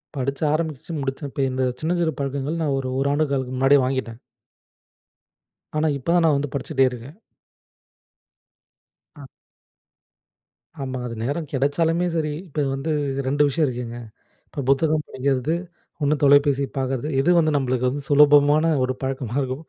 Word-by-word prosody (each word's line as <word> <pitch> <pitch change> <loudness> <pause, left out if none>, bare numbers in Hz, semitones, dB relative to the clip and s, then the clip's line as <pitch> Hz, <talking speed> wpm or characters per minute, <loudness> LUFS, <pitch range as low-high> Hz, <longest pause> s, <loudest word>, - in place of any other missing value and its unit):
படிச்சு, 140 +2 -2
ஆரம்பிச்சுச்சு 160 0 -3
முடிச்சிருப்பேன். 135 +1 -4
இப்ப 140 - -1
இந்த 130 0 -1 0.2
சின்னஞ்சிறு 170 0 0
பழக்கங்கள், 140 +3 -2
நான் 145 -3 0
ஒரு 130 -1 -4
1 140 - +1
ஆண்டு 155 +1 +1
காலத்துக்கு 130 -2 -2
முன்னாடியே 135 +1 +5
வாங்கிட்டேன். 130 -3 -3 1.6
ஆனா, 155 +1 +2
இப்ப 140 +5 -2
தான் 175 -2 +4
நான் 155 -3 +4
வந்து 140 -1 -4
படிச்சிட்டே 135 -1 +1
இருக்கேன். 125 +5 -9 2.0
அ. 145 -2 -11 1.6
ஆமா. 130 -1 -4
அது 115 - -6
நேரம் 145 +4 -3
கிடைச்சாலுமே 160 +6 +1
சரி. 155 -2 0 0.2
இப்ப 155 - -15
இது 135 - -1
வந்து 140 +4 -3 0.4
2 145 +2 +2
விஷயம் 150 +2 +1
இருக்குங்க. 120 -2 -5 0.5
இப்ப 140 - -5
புத்தகம் 150 +2 +2
படிக்கிறது, 135 +4 -1 0.5
1 145 +1 +3
தொலைபேசி 140 0 +5
பாக்கறது. 135 +1 -2
எது 165 - +1
வந்து 155 -2 +2
நம்மளுக்கு 130 -2 0
வந்து 140 +2 -4
சுலபமான 145 +2 +5
ஒரு 130 0 -3
பழக்கமா 130 -3 -3
இருக்கும். 130 +3 -4
140 Hz, 145 wpm, -23 LUFS, 130-155 Hz, 2.0 s, முன்னாடியே